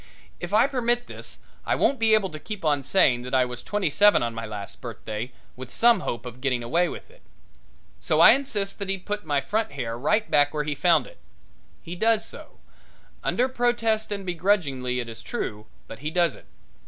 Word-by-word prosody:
If 175 Hz, -, -6 dB
I 215 Hz, +4 st, +5 dB
permit 245 Hz, -3 st, 0 dB
this -, -, -7 dB, 0.3 s
I -, -, 0 dB
won't 275 Hz, -, +1 dB
be 220 Hz, -1 st, +5 dB
able 200 Hz, -3 st, 0 dB
to 155 Hz, -, -7 dB
keep 210 Hz, 0 st, -7 dB
on 145 Hz, -2 st, +2 dB
saying 135 Hz, -5 st, +3 dB
that 125 Hz, +1 st, -3 dB
I 130 Hz, -1 st, +4 dB
was 125 Hz, 0 st, -7 dB
twenty 205 Hz, -6 st, -1 dB
seven 205 Hz, -3 st, +5 dB
on 120 Hz, -1 st, -2 dB
my 115 Hz, 0 st, -5 dB
last 105 Hz, -2 st, -8 dB
birthday, 110 Hz, +4 st, -6 dB, 0.2 s
with 125 Hz, -1 st, -9 dB
some 235 Hz, -2 st, +4 dB
hope 120 Hz, -8 st, -4 dB
of 125 Hz, +1 st, -9 dB
getting 125 Hz, -3 st, 0 dB
away 170 Hz, +9 st, +1 dB
with -, -, -9 dB
it. -, -, -22 dB, 0.8 s
So -, -, 0 dB
I -, -, +10 dB
insist 215 Hz, -9 st, -1 dB
that 200 Hz, -1 st, -4 dB
he 195 Hz, -, 0 dB
put 205 Hz, +2 st, -5 dB
my 145 Hz, -2 st, +2 dB
front 215 Hz, +6 st, -2 dB
hair 120 Hz, -5 st, -4 dB
right 210 Hz, -, +1 dB
back 145 Hz, +1 st, +3 dB
where 150 Hz, -, 0 dB
he 150 Hz, 0 st, -2 dB
found 170 Hz, +4 st, +3 dB
it. -, -, -15 dB, 0.6 s
He 170 Hz, +1 st, -7 dB
does 220 Hz, +3 st, +2 dB
so, -, -, -10 dB, 0.7 s
under 250 Hz, -, +1 dB
protest 240 Hz, -4 st, 0 dB
and 200 Hz, -1 st, -4 dB
begrudgingly, 160 Hz, -9 st, 0 dB
it 120 Hz, -, -4 dB
is 115 Hz, 0 st, -8 dB
true, 105 Hz, -1 st, -5 dB, 0.2 s
but 115 Hz, -, -10 dB
he 150 Hz, +3 st, -3 dB
does 170 Hz, -3 st, +2 dB
it. -, -, -15 dB
175 Hz, 205 wpm, -25 LUFS, -, 0.8 s, I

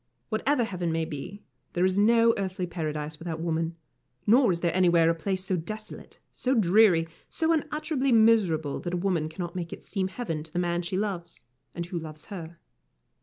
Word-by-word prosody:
Whatever 245 Hz, +4 st, +1 dB
heaven 180 Hz, -6 st, -2 dB
may 160 Hz, 0 st, 0 dB
be, 160 Hz, +8 st, -7 dB, 0.3 s
there 175 Hz, +1 st, +2 dB
is 185 Hz, 0 st, +2 dB
no 230 Hz, +3 st, +5 dB
earthly 190 Hz, -2 st, -2 dB
paradise 155 Hz, -3 st, -4 dB
without 165 Hz, -1 st, -4 dB
woman, 165 Hz, 0 st, -1 dB, 0.5 s
nor 240 Hz, 0 st, +5 dB
is 170 Hz, -1 st, -2 dB
there 170 Hz, -1 st, 0 dB
anywhere 170 Hz, -3 st, +5 dB
a -, -, +1 dB
place 185 Hz, +3 st, -3 dB
so 190 Hz, -, +1 dB
desolate, 215 Hz, +6 st, -7 dB
so 260 Hz, +1 st, 0 dB
dreary, 190 Hz, -5 st, +5 dB, 0.2 s
so 325 Hz, 0 st, +1 dB
unutterably 305 Hz, -3 st, -1 dB
miserable 205 Hz, -, +3 dB
that 175 Hz, 0 st, -3 dB
a -, -, 0 dB
woman 175 Hz, -4 st, 0 dB
cannot 175 Hz, +2 st, -6 dB
make 170 Hz, -2 st, -4 dB
it -, -, -8 dB
seem 190 Hz, -2 st, -2 dB
heaven 190 Hz, -6 st, -4 dB
to 155 Hz, +1 st, -12 dB
the 175 Hz, -, -5 dB
man 175 Hz, -1 st, +1 dB
she 180 Hz, +2 st, -3 dB
loves, 185 Hz, -, -4 dB, 0.3 s
and 170 Hz, -, -3 dB
who 175 Hz, 0 st, -4 dB
loves 155 Hz, -1 st, -8 dB
her. 170 Hz, -2 st, -7 dB
180 Hz, 185 wpm, -27 LUFS, 165-215 Hz, 0.5 s, no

